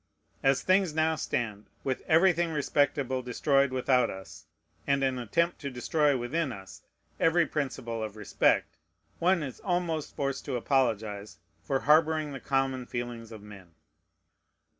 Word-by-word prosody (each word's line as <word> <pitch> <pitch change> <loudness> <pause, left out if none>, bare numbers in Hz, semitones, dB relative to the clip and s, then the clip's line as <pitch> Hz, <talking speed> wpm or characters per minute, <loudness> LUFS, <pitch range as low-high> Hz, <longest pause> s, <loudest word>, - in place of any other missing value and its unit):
As 135 -1 +2
things 185 -4 +2
now 160 0 +2
stand, 110 -7 -3 0.2
with 130 -2 -2
everything 175 +1 +4
respectable 140 -3 0
destroyed 135 +3 +2
without 130 0 +2
us, 90 -4 -10 0.4
and 140 -1 +2
an 130 -1 0
attempt 170 +10 0
to 140 - -4
destroy 140 +3 +1
within 135 +5 -1
us 95 -4 -10 0.4
every 165 +1 +4
principle 125 -7 -3
of 110 -1 -5
respect, 105 -2 +1 0.4
one 175 -1 +2
is 135 -3 -7
almost 175 -4 -2
forced 140 -1 -2
to 135 - -3
apologize 110 -5 -1 0.3
for 135 -1 -1
harboring 155 0 +3
the 135 - -6
common 135 -2 -1
feelings 120 -2 -5
of 110 -2 -10
men. 95 -5 -13
135 Hz, 140 wpm, -29 LUFS, 120-155 Hz, 0.4 s, everything